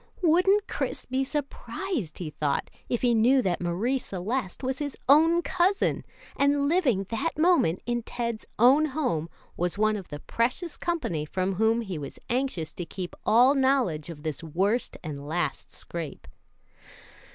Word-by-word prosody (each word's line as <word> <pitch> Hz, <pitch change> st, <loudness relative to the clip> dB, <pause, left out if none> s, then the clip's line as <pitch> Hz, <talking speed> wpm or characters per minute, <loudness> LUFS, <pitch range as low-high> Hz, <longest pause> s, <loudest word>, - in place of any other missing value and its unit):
Wouldn't 375 Hz, +5 st, +4 dB
Chris -, -, -3 dB
be 260 Hz, +1 st, 0 dB
surprised, 290 Hz, -, -4 dB
he 165 Hz, -4 st, -5 dB
thought, 145 Hz, -2 st, -1 dB, 0.2 s
if 240 Hz, -, -1 dB
he 240 Hz, -1 st, +4 dB
knew 245 Hz, +4 st, +4 dB
that 180 Hz, -2 st, 0 dB
Marie 200 Hz, +10 st, 0 dB
Celeste 205 Hz, +3 st, -3 dB
was 260 Hz, +2 st, -2 dB
his 290 Hz, -2 st, -4 dB
own 325 Hz, +5 st, +6 dB
cousin, 375 Hz, +3 st, +1 dB, 0.3 s
and 280 Hz, 0 st, +2 dB
living 285 Hz, -, +2 dB
that 260 Hz, +9 st, -2 dB
moment 315 Hz, -, +3 dB
in 240 Hz, 0 st, -1 dB
Ted's 235 Hz, -1 st, -4 dB
own 270 Hz, +7 st, +6 dB
home 170 Hz, -, 0 dB, 0.3 s
was 175 Hz, +2 st, -1 dB
one 215 Hz, 0 st, +3 dB
of 195 Hz, -4 st, -6 dB
the 145 Hz, -, -7 dB
precious 250 Hz, -, -1 dB
company 315 Hz, -, -2 dB
from 185 Hz, +5 st, -1 dB
whom 220 Hz, +4 st, +2 dB
he 190 Hz, -8 st, -5 dB
was 140 Hz, -2 st, -7 dB
anxious 245 Hz, -, -1 dB
to 175 Hz, -, -5 dB
keep 180 Hz, +1 st, -6 dB
all 245 Hz, +5 st, +6 dB
knowledge 260 Hz, -, +1 dB
of 150 Hz, -3 st, -9 dB
this 155 Hz, -1 st, -3 dB
worst 190 Hz, +9 st, 0 dB
and 145 Hz, -3 st, -6 dB
last 175 Hz, +3 st, -2 dB
scrape. 165 Hz, -3 st, -6 dB
235 Hz, 155 wpm, -27 LUFS, 175-280 Hz, 0.3 s, own